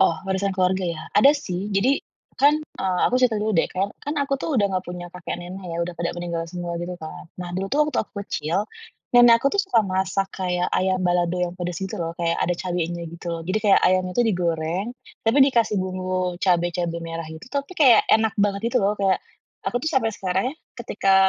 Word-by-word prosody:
Oh, 165 - +4
warisan 195 +1 0
keluarga 185 0 +1
ya? 170 -2 -3
Ada 275 +7 +7
sih, 205 -8 -4
jadi 255 +8 +3 0.4
kan, 290 +2 +6
eee, 190 -11 -3
aku 250 - +1
cerita 245 -4 +2
dulu 215 +1 0
deh, - - +4
kan 200 +9 -3
aku 275 0 0
tuh 320 - -2
udah 200 - +4
gak 185 - -3
punya 175 0 -6
kakek 175 0 -5
nenek 185 +2 -8
ya, - - -3
udah 175 0 -6
pada 170 0 -1
meninggal 170 -1 -3
semua 175 -1 -4
gitu 175 +1 -4
kan. 155 -1 -8 0.2
Nah, 180 - -5
dulu 195 +1 -2 0.2
waktu 275 - -2
aku - - -39
kecil, 175 +6 -2 0.5
nenek 240 -1 +8
aku 275 +10 +1
suka 385 - +3
masak 190 -1 -1
kayak 180 -1 0
ayam 185 0 +1
balado 175 -1 +1
yang 175 -1 -1
pedes 180 -1 -4
gitu 190 +2 -4
lho, 165 -3 -3
kayak 170 0 +1
ada 175 - +1
cabenya 175 -2 -2
gitu 170 +2 -11
lho, 165 - -4
jadi 195 +3 +1
kayak 200 -2 +6
ayamnya 185 0 +1
itu - - +4
digoreng, 175 0 -1 0.4
tapi 225 +5 +3
dikasih 230 -5 +2
bumbu 185 -1 -2
cabe-cabe 175 -2 +1
merah 165 0 -5
gitu, 160 +7 -10
tapi 280 +5 -3
kayak 250 -7 +7
enak 220 -2 +3
banget 200 -1 +1
gitu - - +4
lho. 200 - +3
Kayak 195 -1 +3 0.5
aku - - -1
tuh 315 - 0
sampai 225 -5 +2
sekarang 190 -1 -1
ya, - - -16 0.2
ketika 205 -5 +1
185 Hz, 205 wpm, -23 LUFS, 175-215 Hz, 0.5 s, nenek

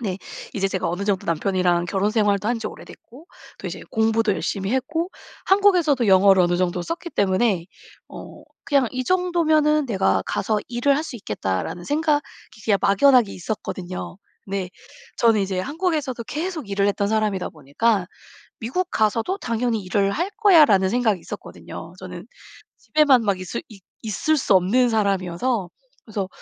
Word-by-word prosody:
네 195 -5 -3 0.4
이제 195 -1 0
제가 190 -2 -2
어느 180 +4 -3
정도 200 -2 -1
남편이랑 175 +1 +1
결혼생활도 205 +2 +1
한 240 -1 0
지 220 - -3
오래됐고 270 +8 -14 0.3
또 - - -7
이제 - - -6
공부도 220 -1 +2
열심히 195 +2 -2
했고 320 +7 -1 0.4
한국에서도 360 - +3
영어를 190 -1 +6
어느 175 0 +2
정도 180 0 -1
썼기 340 - -5
때문에 190 - +1 0.4
어 - - -11 0.2
그냥 280 -3 +2
'이 255 - -2
정도면은 315 -3 +2
내가 195 -6 +1
가서 215 +2 -1
일을 245 +3 +1
할 300 - -1
수 245 - -7
있겠다.'라는 105 - -3
생각이 300 - +1 0.4
그냥 205 -3 +3
막연하게 230 +2 +4
있었거든요. 185 -2 -6 0.3
네. 195 -2 -3 0.5
저는 225 -2 +4
이제 190 -1 -2
한국에서도 295 - -2
계속 315 - -4
일을 200 0 +1
했던 200 0 0
사람이다 215 -3 0
보니까 180 +7 0 0.5
'미국 270 +11 -2
가서도 225 - 0
당연히 230 - -1
일을 195 +2 +1
할 350 - -2
거야.'라는 300 - +5
생각이 220 -3 +1
있었거든요. - - -9
저는 - - -9 0.5
집에만 290 -6 +3
막 200 -3 0
있을 185 - -5
있 205 -4 -14 0.2
있을 225 +9 0
수 260 - +3
없는 225 +8 +3
사람이어서. 200 0 0 0.4
그래서 205 -4 -3
220 Hz, 350 characters per minute, -22 LUFS, 190-275 Hz, 0.5 s, 영어를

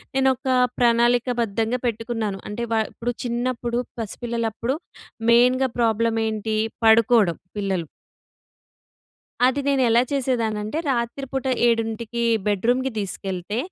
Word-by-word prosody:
నేనొకా 265 -1 +2 0.2
ప్రణాళికబద్ధంగా 235 -1 +2
పెట్టుకున్నాను. 225 -3 -3
అంటే, 220 +3 -4
వా 220 - +3
ఇప్పుడు 245 +1 -3
చిన్నప్పుడు 240 0 -1 0.2
పసిపిల్లలప్పుడు 230 +2 -3 0.6
మెయిన్‌గా 250 +2 +4
ప్రాబ్లమేంటి, 225 -1 0 0.3
పడుకోవడం 220 -5 +5 0.2
పిల్లలు. 190 -4 -1 1.6
అది 260 +2 +2
నేనెలా 245 -4 +4
చేసేదాన్నంటే 235 -2 -1
రాత్రి 240 +2 -2
పూట 265 0 -3 0.2
7కి 230 0 -1 0.2
బెడ్రూమ్‌కి 245 +6 +1
తీసుకెళ్తే, 195 0 -4
235 Hz, 85 wpm, -23 LUFS, 220-245 Hz, 1.6 s, పడుకోవడం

